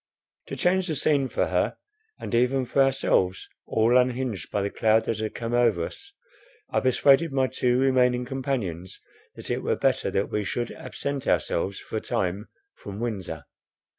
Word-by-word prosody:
To - - -5
change 185 +1 +1
the 160 - -1
scene 140 -1 +2
for - - 0
her, - - 0 0.4
and - - -6
even 125 +2 +2
for 135 +3 +1
ourselves, 130 -8 +1 0.2
all 115 +3 +4
unhinged 125 - -1
by 100 - -1
the 100 - -2
cloud 110 0 +2
that 110 - -2
had 110 -1 -3
come 115 0 -4
over 115 -9 +3
us, 320 0 -10 0.6
I - - +2
persuaded 140 +4 +4
my 135 -1 +2
two 125 -1 +1
remaining 125 -2 +3
companions 120 -10 -4 0.4
that - - -6
it - - -1
were - - 0
better - - +1
that 100 - -1
we 105 - -1
should 120 +4 -3
absent 140 -1 -5
ourselves 95 +3 0
for 110 - -5
a - - -3
time 95 +4 -2 0.3
from 100 0 -9
Windsor. 95 -10 -4
120 Hz, 170 wpm, -26 LUFS, 105-135 Hz, 0.6 s, all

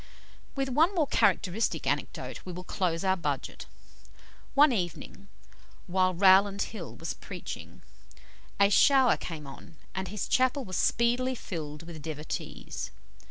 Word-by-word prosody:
With 270 -1 -1
one 320 +9 +3
more 320 -4 +3
characteristic 210 -5 +1
anecdote - - -3
we 185 - -7
will 180 +1 -7
close 175 -2 -1
our 190 -1 +3
budget. 145 -6 -4 0.9
One 290 +1 +7
evening, 195 -1 -4 0.6
while 185 0 +1
Rowland 195 +2 +5
Hill 195 -8 -7
was - - -4
preaching, - - -8 0.8
a 200 0 +5
shower 265 +2 +6
came 155 -4 -7
on, 135 +3 -12 0.2
and 190 0 -3
his 205 +3 -4
chapel 260 +1 +2
was 185 - -5
speedily 245 +2 +2
filled 155 -8 -6
with 165 -2 -9
devotees. 150 - -5
190 Hz, 130 wpm, -29 LUFS, 170-245 Hz, 0.9 s, One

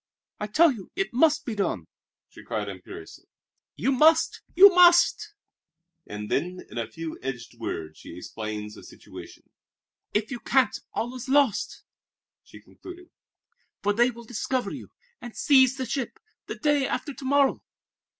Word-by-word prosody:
"I 210 - -3
tell 315 +9 +4
you 210 -8 -9
it 390 -5 -2
must 310 +4 +3
be 235 - -3
done," 190 - -2 0.4
she - - -15
cried 105 -2 -4
imperiously. 95 -4 -10 0.5
"You 265 - 0
must, 315 +5 +3
you 390 +1 +9
must!" 360 +4 +5 0.7
And 105 0 -6
then, 180 +5 -1
in - - -5
a 115 - -3
few 160 +6 -7
edged 125 -3 -7
words, 80 -1 -6
she 85 - -11
explained 105 +2 -6
the - - -13
situation. - - -13 0.6
"If 215 +3 -1
you 245 - -4
can't, 260 -3 +2 0.2
all 240 +2 -2
is 255 0 -8
lost," 275 -5 +1 0.6
she - - -15
concluded, 360 0 -13 0.7
"for 205 +1 +2
they 240 +4 +3
will 235 -1 -10
discover 245 +3 -2
you, - - -9 0.3
and 240 -2 -10
seize 265 -2 +4
the 260 - -3
ship, 260 - -4 0.3
the - - -5
day 295 -3 +1
after 290 - -3
to 270 - -12
morrow. 280 0 +2
245 Hz, 155 wpm, -26 LUFS, -, 0.7 s, you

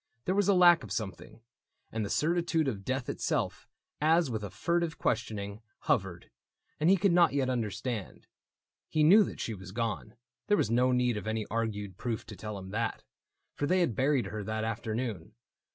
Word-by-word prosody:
There 185 - +1
was 200 0 +2
a 200 - +5
lack 175 -4 +6
Of 105 - -9
something; 105 +2 -5 0.5
and 110 -1 -2
the 100 - -3
certitude 165 -1 +1
of 105 -7 -3
death 130 +3 -2
Itself, - - -2 0.3
as 160 -2 +3
with 110 -2 -3
a 100 - -4
furtive 170 - -1
questioning. 105 -3 -2 0.2
Hovered, 90 -3 -1 0.5
and 155 +3 +3
he 195 - +6
could 195 +1 +3
not 170 -3 +5
yet 135 -2 +1
understand. 115 -2 -3 0.6
He 155 - +2
knew 200 +8 +8
that - - -6
she 115 - -3
was 95 -2 -9
gone 115 0 -3 0.2
— - - -60
there 205 - +4
was 115 - +1
no 125 +2 +3
need 125 -2 +2
Of 105 - -6
any 110 -1 -1
argued 105 -4 -2
proof 115 -3 -3
to - - -9
tell 105 -1 -6
him 95 0 -8
that. 115 +2 -2 0.5
For 145 - -2
they 185 +3 +3
had 165 -9 +1
buried 135 -3 +2
her 105 +2 -5
that 110 +1 -2
afternoon. 110 -3 -3
115 Hz, 190 wpm, -30 LUFS, 105-155 Hz, 0.6 s, knew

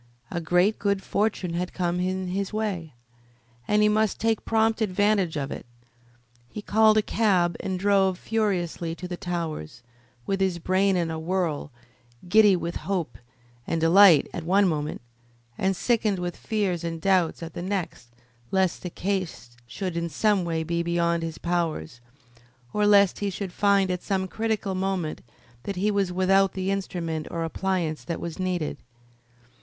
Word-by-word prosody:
A 175 - -2
great 180 +6 +2
good 200 -1 0
fortune 200 -4 -1
had 180 +1 -3
come 175 -1 -1
in 185 0 -2
his 195 +1 -2
way, 195 - -3 0.7
and 210 0 +3
he - - +5
must 215 -1 +1
take 225 -1 0
prompt 225 0 +2
advantage 200 -4 +1
of 140 -1 -3
it. - - -7 0.8
He 210 - -7
called 220 +1 +4
a 215 - +4
cab 185 -7 +2
and 190 -1 -3
drove 190 -1 +2
furiously 180 -7 -1
to 180 - -7
the 180 - -4
Towers, 160 - -5 0.4
with 195 0 -1
his 190 -2 +1
brain 185 +2 +2
in 170 -2 0
a 160 - -4
whirl, 165 -4 -2 0.6
giddy 210 +1 +6
with 170 -1 -3
hope 175 -6 -3 0.5
and 165 - 0
delight 170 +1 +7
at 170 - -4
one 195 +4 +3
moment, 150 -5 -2 0.5
and 190 +6 0
sickened 220 -2 +1
with 175 -1 -3
fears 195 -6 -1
and 165 -1 -3
doubts 180 -2 +1
at 165 -1 -7
the 175 - -5
next 185 -9 -3 0.4
lest 190 -2 +1
the 180 - -5
case 175 - -4
should 180 +8 -4
in 170 0 -2
some 205 +4 +2
way 165 -1 -1
be 170 +1 -1
beyond 170 0 +1
his 165 -1 -4
powers, 160 - -2 0.7
or 210 0 +2
lest 200 -2 +5
he 205 - -1
should 190 -1 -5
find 200 -2 +3
at 180 -1 -2
some 190 -2 -1
critical 220 -1 -2
moment 185 -4 -2 0.4
that 195 +9 -4
he 205 +4 +1
was 200 -3 0
without 190 +1 +3
the 190 0 -2
instrument 170 -5 -3
or 165 -1 -3
appliance 165 -2 -2
that 170 - -4
was 170 +2 -6
needed. 180 -4 -2
185 Hz, 165 wpm, -25 LUFS, 170-200 Hz, 0.8 s, delight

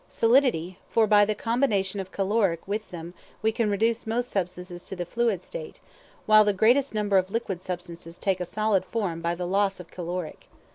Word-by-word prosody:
Solidity; 230 - +2
for 225 - +4
by 205 -1 +5
the 210 +1 -1
combination 210 -4 0
of 190 -1 -6
caloric 195 -4 0
with 215 +2 -3
them 170 0 -8 0.3
we 220 - +3
can 220 -1 0
reduce 225 +3 0
most 240 +2 -1
substances 180 -1 -4
to - - -6
the 175 -1 -4
fluid 225 -1 0
state; - - -8 0.5
while 215 0 +7
the 205 -1 +2
greatest 240 +6 +3
number 205 -2 +3
of 185 0 -3
liquid 200 -5 -3
substances 175 -2 -7
take 190 -2 0
a 180 - -2
solid 215 +1 +1
form 185 -8 -3
by 170 +1 -1
the 180 +1 -4
loss 195 +1 +1
of 180 - -11
caloric. 175 -1 -5
200 Hz, 190 wpm, -26 LUFS, 180-220 Hz, 0.5 s, while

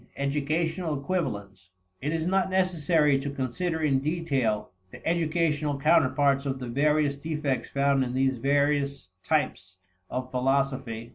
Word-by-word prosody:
Educational 155 +3 -1
Equivalents. 105 - -3 0.3
It 150 - -1
is 165 0 -1
not 190 +1 +1
necessary 165 -6 +2
to 140 +1 -4
consider 160 +5 -2
in 135 -3 +3
detail 135 -8 -1 0.2
the - - -10
educational 160 -3 +1
counterparts 140 -2 +3
of 135 -1 -2
the 125 -1 -6
various 145 +2 +2
defects 145 -4 -2
found 140 -1 +2
in 125 0 -4
these 130 -1 +1
various 140 -3 +1
types 95 -12 -1 0.3
of 130 0 -4
philosophy. 130 -3 -1
140 Hz, 130 wpm, -27 LUFS, 130-160 Hz, 0.3 s, in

